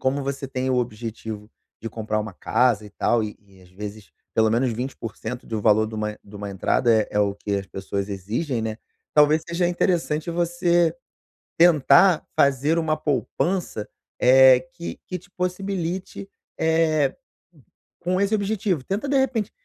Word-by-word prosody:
como 135 +2 0
você 140 0 -4
tem 130 0 -2
o 130 - +2
objetivo 110 -2 -4 0.3
de 115 - -3
comprar 110 0 -2
uma 110 +1 -6
casa 120 -4 +1
e - - -13
tal, 115 +3 +1
e 105 - -7
e 100 -2 -21
às 90 - -19
vezes 105 +2 -8 0.2
pelo 110 -1 +3
menos 120 +3 +2
20% 120 0 -6
de 115 - -5
um - - -2
valor 110 0 +4
de 110 - -8
uma 105 0 -3
de 100 +1 -12
uma 100 0 -6
entrada 105 +5 +2
é 110 -1 +3
é 105 - +2
o 100 -1 +1
que 100 0 -3
as 100 -1 -4
pessoas 100 +1 -4
exigem, 115 - -3
né. 110 0 -4 0.4
Talvez 150 +1 +5
seja 170 +1 +1
interessante 170 -3 0
você 170 0 +2 0.6
tentar 165 +1 +5
fazer 140 +4 +3
uma 160 -1 +1
poupança, 155 - -1 0.3
eh, 130 0 +7
que 170 -1 -7
que 180 - -4
te 200 - -22
possibilite, 185 0 -3 0.3
eh, 160 -3 +2 0.9
com 180 +2 0
esse 200 +2 +2
objetivo, 200 - -1
tenta 200 - -3
de 280 - +3
repente 245 -6 0
130 Hz, 165 wpm, -23 LUFS, 110-170 Hz, 0.9 s, eh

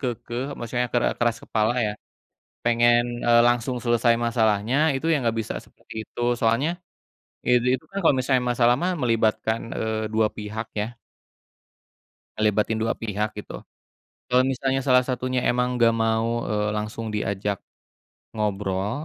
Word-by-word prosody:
keukeuh, 120 0 -3
maksudnya 120 +1 -1
kera 120 - +3
keras 120 -1 +1
kepala 110 +1 +1
ya, 105 - -1 0.7
pengen, 120 0 +4 0.3
eee, 120 0 +6
langsung 120 +1 0
selesai 120 0 +3
masalahnya, 110 0 +1 0.2
itu 135 - -4
ya - - +4
enggak 115 -2 -1
bisa - - -5
seperti - - -16
itu, - - -13 0.2
soalnya, 115 +7 +2 0.8
itu 125 0 +4
itu 130 - -4
kan 200 - -4
kalau 155 - +5
misalnya 130 0 +2
masalah 120 0 +4
mah 185 +1 +1
melibatkan, 110 -1 +1 0.2
eee, 110 0 -2
2 110 0 +3
pihak 110 +1 -5
ya. 105 - -1 1.5
Ngelibatin 110 +1 +1
2 115 - +1
pihak, 105 -1 -2
gitu. 105 - -7 0.7
Kalau 125 +1 +4
misalnya 135 0 0
salah 125 -1 +5
satunya 130 0 -1
emang 125 +1 0
enggak 115 -1 +4
mau, 115 +1 0
eee, 105 0 0
langsung 105 +1 -4
diajak 100 -1 -2 0.8
ngobrol, 105 +5 -2
115 Hz, 140 wpm, -24 LUFS, 110-125 Hz, 1.5 s, eee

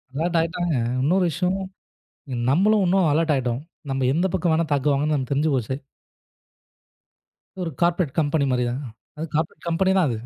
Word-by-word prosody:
Alert 165 +3 0
ஆயிட்டாங்க. 165 0 -1 0.3
இன்னொரு 180 +7 +3
விஷயம். 180 +4 0 0.9
நம்மளும் 200 +7 +4
இன்னும் 185 -2 +3
அலர்ட் 160 +1 +2
ஆயிட்டோம். 125 +1 -2 0.3
நம்ம 135 -1 0
எந்தப் 175 +3 +1
பக்கம் 175 -2 +1
வேணா 165 +1 +1
தாக்குவாங்கன்னு 140 -1 +1
தெரிஞ்சு 150 +2 +2
போச்சு. 130 0 -1 1.9
ஒரு 170 - -2
கார்ப்பரேட் 170 -4 +2
கம்பெனி 145 -1 +1
மாதிரிதாங்க. 125 +2 -1 0.3
அது 160 - -3
கார்ப்பரேட் 160 +2 -2
கம்பெனி 185 +3 +2
தான் 180 - +3
அது. 115 - -1
160 Hz, 140 wpm, -23 LUFS, 140-175 Hz, 1.9 s, நம்மளும்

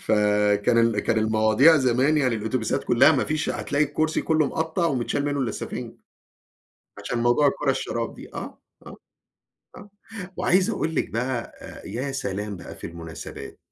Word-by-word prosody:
فكان 105 +1 +2
ال 115 -2 +3
كان 110 +2 +1
المواضيع 110 +8 +4
زمان 130 +2 +2
يعني 130 -5 +2
الأوتوبيسات 110 +4 -2
كلها 120 +6 +5
ما 135 - +1
فيش 155 0 -1
هتلاقي 145 +1 0
الكرسي 155 +2 -1
كله 155 -2 +2
مقطّع 160 +4 -1
ومتشال 140 0 -1
منه 145 -1 -1
السَفِنج. 115 -5 -4 1.1
عشان 120 - -3
موضوع 120 +5 +3
الكورة 140 0 +1
الشراب 115 -3 -3
دي. - - -12
آه، - - -7 0.3
آه، - - -10 0.8
آه 205 0 -13 0.5
وعايز 185 +4 +2
أقول 160 -6 -2
لِك - - 0
بقى 120 +1 -3
آآ - - -11
يا 130 +7 -4
سلام 105 -5 -4
بقى 85 - -10
في - - -7
المناسبات. 85 -1 -9
125 Hz, 155 wpm, -24 LUFS, 110-150 Hz, 1.1 s, كلها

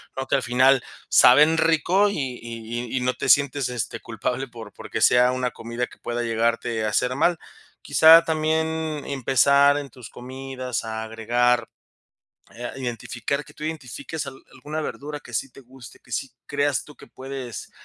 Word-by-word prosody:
¿no? 135 0 -4
Que - - +2
al 135 - 0
final, 130 +1 +4 0.3
saben 150 +6 +6
rico 165 +5 +3
y 135 -8 -4
y 115 +1 -6
y - - 0
no 125 0 0
te - - -4
sientes, 140 -2 +3
este, 120 -3 -4
culpable 120 +4 -3
por 115 -2 -11
porque - - -6
sea 125 +1 +5
una 125 -1 -1
comida 115 +1 -4
que - - -17
pueda 120 0 -4
llegarte 115 -1 0
a - - 0
hacer 125 +4 0
mal. 165 +4 +2 0.4
Quizá, 165 +1 +7
también 160 -1 -1
empezar 140 +2 +4
en 140 - -8
tus 125 -4 -12
comidas, 130 -1 -6
a 110 0 -4
agregar 120 +1 +1 0.9
Eh, 120 +1 -9
a - - -8
identificar. 125 +3 -3
Que - - -17
tú - - -12
identifiques 155 0 -5
al 135 -1 -8 0.2
alguna 150 +4 -6
verdura, 150 0 -6
que 125 - -14
sí 135 +4 -2
te 135 - -15
guste, 125 -1 -15
que 120 - -20
sí 135 +4 -3 0.2
creas 145 -2 0
tú, 150 - -15
que - - -14
puedes 130 -4 -8
130 Hz, 175 wpm, -24 LUFS, 120-145 Hz, 0.9 s, Quizá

